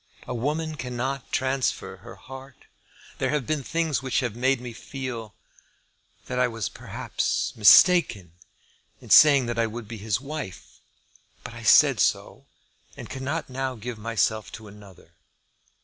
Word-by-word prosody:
A -, -, -5 dB
woman 155 Hz, +6 st, -2 dB
cannot 130 Hz, +1 st, -4 dB
transfer 130 Hz, -6 st, -1 dB
her 115 Hz, +5 st, -12 dB
heart. 130 Hz, 0 st, -13 dB, 0.5 s
There -, -, 0 dB
have 150 Hz, -4 st, -1 dB
been 155 Hz, +1 st, -1 dB
things 160 Hz, 0 st, -1 dB
which 130 Hz, -1 st, 0 dB
have 120 Hz, -4 st, -3 dB
made 130 Hz, +2 st, +1 dB
me 125 Hz, -1 st, -8 dB
feel, 120 Hz, -4 st, -7 dB, 0.9 s
that 125 Hz, -1 st, -3 dB
I 125 Hz, -, +3 dB
was 115 Hz, -5 st, -4 dB
perhaps -, -, -3 dB
mistaken, 105 Hz, -, +5 dB, 0.7 s
in -, -, -12 dB
saying 140 Hz, -4 st, +7 dB
that 120 Hz, 0 st, -3 dB
I 115 Hz, -, +2 dB
would 115 Hz, 0 st, -8 dB
be, 115 Hz, -1 st, -8 dB
his 105 Hz, 0 st, -1 dB
wife. 140 Hz, -, -8 dB, 0.6 s
But -, -, -8 dB
I -, -, -10 dB
said -, -, +5 dB
so, -, -, -1 dB, 0.5 s
and -, -, -9 dB
cannot 140 Hz, +4 st, -4 dB
now 130 Hz, 0 st, -4 dB
give 115 Hz, 0 st, -7 dB
myself 110 Hz, -1 st, -1 dB
to 110 Hz, +2 st, -10 dB
another. 100 Hz, -2 st, -16 dB
125 Hz, 150 wpm, -25 LUFS, 115-135 Hz, 0.9 s, saying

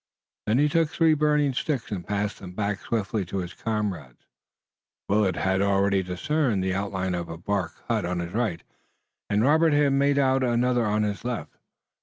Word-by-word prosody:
Then 110 Hz, +3 st, +3 dB
he 145 Hz, +2 st, +4 dB
took 160 Hz, +1 st, +2 dB
three 160 Hz, 0 st, +3 dB
burning 150 Hz, -2 st, +2 dB
sticks 135 Hz, -3 st, -2 dB
and 95 Hz, -4 st, -3 dB
passed 105 Hz, 0 st, -2 dB
them 90 Hz, -2 st, -9 dB
back 100 Hz, 0 st, -2 dB
swiftly 110 Hz, -2 st, -1 dB
to 95 Hz, -, -5 dB
his 90 Hz, -1 st, -4 dB
comrades. 100 Hz, -, -4 dB, 0.8 s
Willet 100 Hz, -2 st, +2 dB
had 95 Hz, 0 st, +1 dB
already 100 Hz, 0 st, +2 dB
discerned 110 Hz, -, 0 dB
the 95 Hz, 0 st, 0 dB
outline 95 Hz, -1 st, -2 dB
of 85 Hz, -1 st, -3 dB
a 80 Hz, -, -6 dB
bark 95 Hz, 0 st, -2 dB
hut 115 Hz, -4 st, 0 dB
on 90 Hz, +1 st, -2 dB
his 85 Hz, 0 st, -4 dB
right 110 Hz, -8 st, -1 dB, 0.7 s
and 105 Hz, +2 st, +2 dB
Robert 160 Hz, +3 st, +4 dB
had 145 Hz, -1 st, +3 dB
made 140 Hz, +1 st, +2 dB
out 135 Hz, -1 st, +3 dB
another 120 Hz, -1 st, +2 dB
on 105 Hz, +1 st, +1 dB
his 105 Hz, 0 st, -3 dB
left. 120 Hz, -2 st, -4 dB
105 Hz, 180 wpm, -26 LUFS, 95-135 Hz, 0.8 s, he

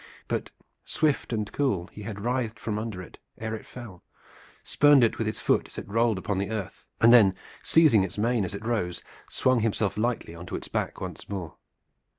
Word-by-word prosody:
But, -, -, -2 dB, 0.3 s
swift 150 Hz, -5 st, 0 dB
and 105 Hz, -3 st, -2 dB
cool, 125 Hz, -12 st, 0 dB
he 105 Hz, -, -10 dB
had 105 Hz, -1 st, -6 dB
writhed 120 Hz, -1 st, -1 dB
from 105 Hz, -1 st, -3 dB
under 110 Hz, -5 st, -5 dB
it -, -, -14 dB, 0.2 s
ere 110 Hz, 0 st, -4 dB
it 110 Hz, -, -7 dB
fell, 110 Hz, -8 st, -10 dB, 0.6 s
spurned 145 Hz, -3 st, +5 dB
it 115 Hz, -, +2 dB
with 110 Hz, -, 0 dB
his 110 Hz, -, -3 dB
foot -, -, +1 dB
as -, -, -14 dB
it -, -, -6 dB
rolled 115 Hz, +1 st, +2 dB
upon 95 Hz, +1 st, -2 dB
the 100 Hz, -, -2 dB
earth, 110 Hz, -4 st, -5 dB
and 115 Hz, +1 st, +7 dB
then 100 Hz, -6 st, +7 dB, 0.3 s
seizing 150 Hz, -, +5 dB
its 95 Hz, -, -5 dB
mane 115 Hz, +1 st, +1 dB
as 95 Hz, +1 st, -4 dB
it 100 Hz, +2 st, -7 dB
rose 90 Hz, -7 st, -1 dB, 0.3 s
swung 130 Hz, -1 st, +2 dB
himself 105 Hz, -2 st, 0 dB
lightly 115 Hz, -6 st, -1 dB
on 85 Hz, +1 st, -10 dB
to -, -, -4 dB
its -, -, -5 dB
back -, -, -2 dB
once -, -, -7 dB
more. 90 Hz, -8 st, -5 dB
110 Hz, 200 wpm, -27 LUFS, 100-120 Hz, 0.6 s, and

